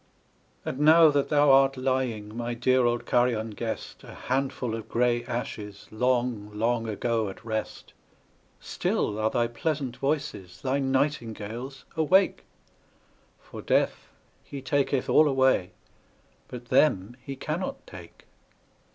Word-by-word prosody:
And 130 Hz, -, -4 dB
now 160 Hz, +2 st, +7 dB
that 145 Hz, -1 st, 0 dB
thou 145 Hz, -2 st, +5 dB
art 135 Hz, 0 st, +5 dB
lying, 130 Hz, -5 st, -2 dB
my 120 Hz, 0 st, -3 dB
dear 130 Hz, +1 st, +2 dB
old 120 Hz, 0 st, -1 dB
Carian 120 Hz, -3 st, +1 dB
guest, 110 Hz, +2 st, -6 dB
A -, -, -11 dB
handful 130 Hz, -2 st, -2 dB
of 115 Hz, -1 st, -6 dB
grey 120 Hz, 0 st, +1 dB
ashes, 105 Hz, -4 st, -6 dB
long, 120 Hz, -2 st, 0 dB
long 115 Hz, +1 st, 0 dB
ago 110 Hz, 0 st, -1 dB
at 105 Hz, +4 st, -11 dB
rest, 110 Hz, -1 st, -5 dB, 0.7 s
Still 105 Hz, 0 st, -2 dB
are 110 Hz, 0 st, +2 dB
thy 120 Hz, 0 st, +1 dB
pleasant 130 Hz, +1 st, -3 dB
voices, 135 Hz, -, -3 dB
thy 135 Hz, +1 st, 0 dB
nightingales, 130 Hz, -2 st, -2 dB
awake; 185 Hz, +5 st, +3 dB, 0.9 s
For -, -, -10 dB
Death, -, -, 0 dB, 0.3 s
he 140 Hz, -, -8 dB
taketh 135 Hz, 0 st, 0 dB
all 155 Hz, -, +5 dB
away, 130 Hz, -9 st, +2 dB, 0.8 s
but 120 Hz, -1 st, -10 dB
them 120 Hz, -5 st, +2 dB
he 135 Hz, +2 st, -7 dB
cannot 155 Hz, +7 st, -4 dB
take. 90 Hz, -4 st, -13 dB
125 Hz, 125 wpm, -27 LUFS, 115-135 Hz, 0.9 s, now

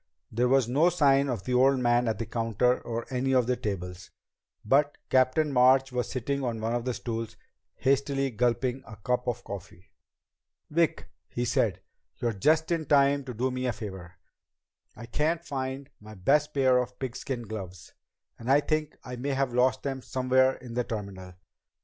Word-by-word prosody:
There 120 Hz, +3 st, +1 dB
was 130 Hz, -2 st, +3 dB
no 145 Hz, +8 st, +4 dB
sign 140 Hz, -5 st, +3 dB
of 115 Hz, -7 st, -3 dB
the 125 Hz, -, -2 dB
old 135 Hz, +2 st, +4 dB
man 120 Hz, -1 st, +2 dB
at 110 Hz, -, 0 dB
the 115 Hz, -, -3 dB
counter 115 Hz, +2 st, +1 dB
or 115 Hz, 0 st, -4 dB
any 130 Hz, +1 st, 0 dB
of 125 Hz, -2 st, +4 dB
the 125 Hz, +1 st, +1 dB
tables, 90 Hz, -6 st, -5 dB, 0.6 s
but 145 Hz, +5 st, +3 dB
Captain 130 Hz, +3 st, +3 dB
March 130 Hz, +1 st, +5 dB
was 125 Hz, -1 st, -2 dB
sitting 135 Hz, +2 st, -2 dB
on 120 Hz, -3 st, -2 dB
one 110 Hz, +1 st, -1 dB
of 120 Hz, 0 st, -2 dB
the 125 Hz, -2 st, -1 dB
stools, 115 Hz, -1 st, -5 dB, 0.4 s
hastily 135 Hz, 0 st, +1 dB
gulping 120 Hz, +3 st, 0 dB
a 110 Hz, -, -9 dB
cup 125 Hz, +4 st, -2 dB
of 120 Hz, 0 st, -2 dB
coffee. 95 Hz, -2 st, -9 dB, 0.8 s
"Vic," 165 Hz, 0 st, +1 dB, 0.2 s
he 120 Hz, -, -2 dB
said, -, -, +1 dB, 0.4 s
"you're 120 Hz, -2 st, -1 dB
just 155 Hz, -, +2 dB
in 160 Hz, -3 st, -1 dB
time 140 Hz, 0 st, +4 dB
to 125 Hz, -, -6 dB
do 130 Hz, +4 st, 0 dB
me 130 Hz, 0 st, -2 dB
a 120 Hz, -, 0 dB
favor. 95 Hz, -5 st, -8 dB, 0.8 s
I 115 Hz, -, -9 dB
can't 160 Hz, +7 st, -1 dB
find 135 Hz, -1 st, -4 dB
my 110 Hz, 0 st, -12 dB
best 145 Hz, +11 st, +2 dB
pair 130 Hz, -2 st, +3 dB
of 125 Hz, 0 st, -4 dB
pigskin 130 Hz, -1 st, -4 dB
gloves, 95 Hz, -5 st, -8 dB, 0.5 s
and 115 Hz, -, -6 dB
I 140 Hz, -, +6 dB
think 155 Hz, 0 st, -2 dB
I 125 Hz, -1 st, -7 dB
may 140 Hz, +3 st, -2 dB
have 135 Hz, -2 st, 0 dB
lost 130 Hz, +1 st, +2 dB
them 135 Hz, -2 st, -3 dB
somewhere 130 Hz, +1 st, +2 dB
in 120 Hz, -2 st, -10 dB
the 125 Hz, +1 st, 0 dB
terminal. 100 Hz, -5 st, -7 dB
125 Hz, 180 wpm, -28 LUFS, 115-135 Hz, 0.8 s, I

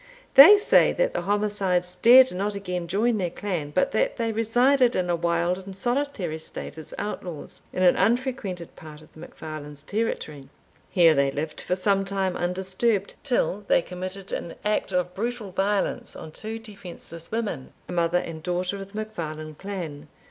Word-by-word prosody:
They 315 Hz, +10 st, +11 dB
say 410 Hz, -, +4 dB
that -, -, 0 dB
the -, -, -1 dB
homicides 200 Hz, -4 st, 0 dB
dared 250 Hz, +7 st, +7 dB
not 200 Hz, +3 st, -2 dB
again 180 Hz, -3 st, -4 dB
join 215 Hz, +5 st, +1 dB
their 180 Hz, -2 st, 0 dB
clan, 175 Hz, -5 st, -4 dB
but 165 Hz, +5 st, +1 dB
that -, -, 0 dB
they 230 Hz, -2 st, -1 dB
resided 245 Hz, +3 st, +3 dB
in 180 Hz, -1 st, 0 dB
a -, -, +2 dB
wild 170 Hz, +2 st, 0 dB
and 190 Hz, 0 st, -10 dB
solitary 240 Hz, -, -1 dB
state 155 Hz, -, -8 dB
as 155 Hz, -, -9 dB
outlaws, 180 Hz, -6 st, -6 dB
in 185 Hz, -, -1 dB
an 180 Hz, -, +6 dB
unfrequented 220 Hz, -5 st, -1 dB
part 155 Hz, -1 st, -12 dB
of 155 Hz, -, -21 dB
the -, -, -15 dB
MacFarlanes' 150 Hz, -3 st, -8 dB
territory. 155 Hz, -10 st, -3 dB, 0.4 s
Here 170 Hz, -3 st, +5 dB
they 140 Hz, -1 st, +2 dB
lived 150 Hz, +3 st, -4 dB
for 180 Hz, -, -1 dB
some 195 Hz, +1 st, +1 dB
time 195 Hz, -1 st, -1 dB
undisturbed, 190 Hz, +4 st, -1 dB
till 225 Hz, -6 st, 0 dB
they 175 Hz, -, +3 dB
committed 185 Hz, +2 st, -6 dB
an 170 Hz, -, -4 dB
act 210 Hz, -2 st, 0 dB
of 180 Hz, -1 st, -1 dB
brutal 225 Hz, 0 st, -4 dB
violence 195 Hz, +2 st, -1 dB
on 155 Hz, -, -9 dB
two 220 Hz, +7 st, -6 dB
defenceless 190 Hz, -6 st, -10 dB
women, 220 Hz, -, -3 dB, 0.2 s
a -, -, -8 dB
mother 170 Hz, 0 st, +1 dB
and 165 Hz, -2 st, -4 dB
daughter 180 Hz, +3 st, -2 dB
of 195 Hz, +1 st, -9 dB
the -, -, -7 dB
MacFarlane 155 Hz, -8 st, -5 dB
clan. 160 Hz, -4 st, -6 dB
185 Hz, 170 wpm, -25 LUFS, 170-215 Hz, 0.4 s, They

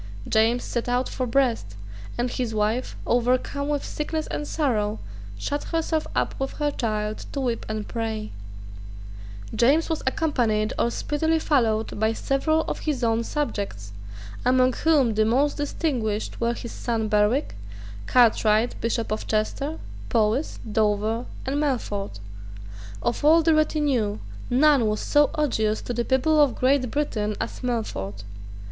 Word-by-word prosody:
James 225 Hz, +3 st, +3 dB
set 240 Hz, 0 st, -3 dB
out 250 Hz, +1 st, +1 dB
for 255 Hz, -, -3 dB
Brest; 230 Hz, -, +1 dB, 0.4 s
and 245 Hz, 0 st, -1 dB
his 240 Hz, -3 st, -2 dB
wife, 215 Hz, +4 st, 0 dB
overcome 255 Hz, +4 st, +1 dB
with 295 Hz, -1 st, -1 dB
sickness 310 Hz, +1 st, -3 dB
and 295 Hz, -, -4 dB
sorrow, 220 Hz, -9 st, 0 dB, 0.4 s
shut 290 Hz, -, -3 dB
herself 320 Hz, -1 st, -1 dB
up -, -, +1 dB
with 270 Hz, 0 st, -2 dB
her 295 Hz, -1 st, -1 dB
child 215 Hz, -4 st, -2 dB
to 280 Hz, -, -3 dB
weep 245 Hz, -3 st, -2 dB
and 215 Hz, -1 st, -3 dB
pray, 220 Hz, -2 st, -3 dB, 1.2 s
James 295 Hz, +8 st, +3 dB
was 320 Hz, -, -1 dB
accompanied 235 Hz, -8 st, +1 dB
or 235 Hz, -, +3 dB
speedily 320 Hz, +6 st, 0 dB
followed 225 Hz, -10 st, +1 dB
by 220 Hz, +1 st, +2 dB
several 315 Hz, +6 st, +1 dB
of -, -, -4 dB
his 285 Hz, -5 st, -2 dB
own 230 Hz, 0 st, +2 dB
subjects, 200 Hz, -, -3 dB, 0.5 s
among 255 Hz, 0 st, +4 dB
whom 280 Hz, -5 st, +3 dB
the 215 Hz, +1 st, +3 dB
most 265 Hz, +7 st, +2 dB
distinguished 250 Hz, -9 st, -2 dB
were 235 Hz, 0 st, +1 dB
his 235 Hz, -, -7 dB
son 225 Hz, -2 st, -2 dB
Berwick, 210 Hz, +7 st, +2 dB, 0.5 s
Cartwright 225 Hz, -1 st, +4 dB
Bishop 230 Hz, -1 st, -1 dB
of 215 Hz, -, -3 dB
Chester, 275 Hz, +8 st, -1 dB, 0.3 s
Powis, 230 Hz, +5 st, +1 dB
Dover, 215 Hz, +2 st, +1 dB, 0.2 s
and 280 Hz, +3 st, 0 dB
Melfort. 205 Hz, -, -2 dB, 0.8 s
Of 240 Hz, -, -1 dB
all 320 Hz, +2 st, +6 dB
the 325 Hz, 0 st, +4 dB
retinue, 290 Hz, -9 st, +1 dB, 0.3 s
none 265 Hz, -1 st, +4 dB
was 210 Hz, 0 st, 0 dB
so 290 Hz, -1 st, +3 dB
odious 220 Hz, -8 st, +1 dB
to 245 Hz, -, -3 dB
the 240 Hz, 0 st, 0 dB
people 300 Hz, +4 st, +3 dB
of 285 Hz, -4 st, +3 dB
Great 255 Hz, -1 st, +2 dB
Britain 215 Hz, -7 st, -1 dB
as -, -, -4 dB
Melfort. 105 Hz, -, -3 dB
245 Hz, 140 wpm, -25 LUFS, 220-290 Hz, 1.2 s, all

